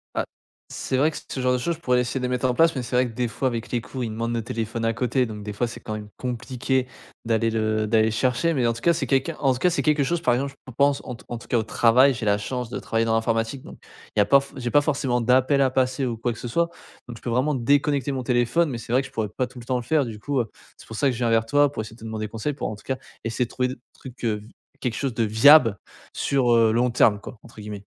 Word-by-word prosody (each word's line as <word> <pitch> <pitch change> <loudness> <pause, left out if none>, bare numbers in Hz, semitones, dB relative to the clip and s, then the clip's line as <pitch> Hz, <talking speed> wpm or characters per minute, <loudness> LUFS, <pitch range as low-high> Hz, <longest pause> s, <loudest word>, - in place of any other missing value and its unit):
Ah, - - 0 0.4
c'est 130 - -2
vrai 150 +4 +3
que - - -7
ce - - -4
genre 125 0 +2
de - - +2
choses, 170 +7 -1
je 160 - -18
pourrais 125 -5 +2
essayer 125 +2 -1
de 125 - -2
les 125 - -1
mettre 125 0 0
en - - +1
place 165 -1 +4
mais 130 - -1
c'est 125 - -4
vrai 125 0 +3
que 115 - -9
des 125 +1 -1
fois, 130 +3 -2
avec 120 -2 -4
les 120 - +1
cours, 130 +1 -6
ils 115 - -2
demandent 115 +2 -3
le 115 -2 -2
téléphone 115 0 -4
à 115 - +1
côté 125 +2 +1
donc, 105 -2 -7
des 105 - -5
fois, 120 +4 -1
c'est 120 - -8
quand 110 - -5
même 105 -1 -7
compliqué 130 +1 -2 0.4
d'aller 115 0 +1
le 110 -1 0
d'aller 110 0 +3
le - - +2
chercher, 125 +8 +1
mais 125 - +1
en 115 - +2
tout 115 - -9
cas, 170 - +4
c'est 155 -4 -2
quelqu'un 135 +5 +1
en 135 -2 +3
tout 125 - -5
cas, 180 - +3
c'est 170 - 0
quelque 150 -2 +3
chose, 170 +5 -1
par 125 - +3
exemple 135 +3 -1
je 130 - -9
pense, 140 0 +3
en 125 - -6
tout 115 - -17
cas - - -6
en - - -4
tout - - -13
cas, 120 - +1
au - - -1
travail, 120 +5 +4
j'ai 115 - -4
la 100 0 +3
chance 125 +2 -4
de - - -3
travailler 115 0 0
dans 115 - +1
l'informatique 115 +3 0
donc - - -11 0.4
il - - +2
y - - +7
a - - +4
pas 140 - +6
f 140 - -10
j'ai 120 -2 -3
pas 145 - +5
forcément 135 -4 0
d'appel 130 +4 +3
à 135 - +4
passer 130 +1 0
ou 115 -2 -3
quoi 120 +1 -1
que 115 - -11
ce - - -5
soit 170 +8 +1 0.4
donc 120 -1 -8
je - - -16
peux 120 - -4
vraiment 130 +6 +1
déconnecter 140 +2 +1
mon 130 -2 -3
téléphone 125 +7 +2
mais 125 - -4
c'est 115 - -8
vrai 130 +2 +4
que - - -8
je - - -19
pourrais 110 -2 -2
pas 130 - +1
tout 125 0 -12
le 120 - -11
temps 130 - -1
le 125 - -4
faire 145 +2 +2
du 110 -2 -7
coup. 140 +4 -1
Heu, 115 -4 -1 0.3
c'est - - -15
pour 110 - -8
ça 140 - +2
que 135 - +3
je 120 - -6
viens 120 -2 0
vers 115 0 +3
toi 145 +4 +3
pour 125 - -4
essayer 110 +1 -11
de - - -19
te 115 - -10
demander 110 -1 -4
conseils 115 +7 -3
pour, 140 - -4
en 105 - -5
tout 105 - -17
cas, 130 - -2 0.3
essayer 115 +2 -1
de - - -15
trouver 125 0 0
des 130 - -5 0.2
trucs, 125 -2 -12
heu, 110 -2 +1
v - - -15 0.3
quelque 125 -3 -1
chose 135 -3 -2
de 115 - 0
viable 115 +1 +6 0.4
sur, 130 -4 +1
heu, 115 -1 +4
«long 120 +3 +2
terme», 110 -3 +3
quoi, 110 - -10
entre 115 -2 -14
guillemets. 105 -1 -7
125 Hz, 320 wpm, -24 LUFS, 115-135 Hz, 0.4 s, y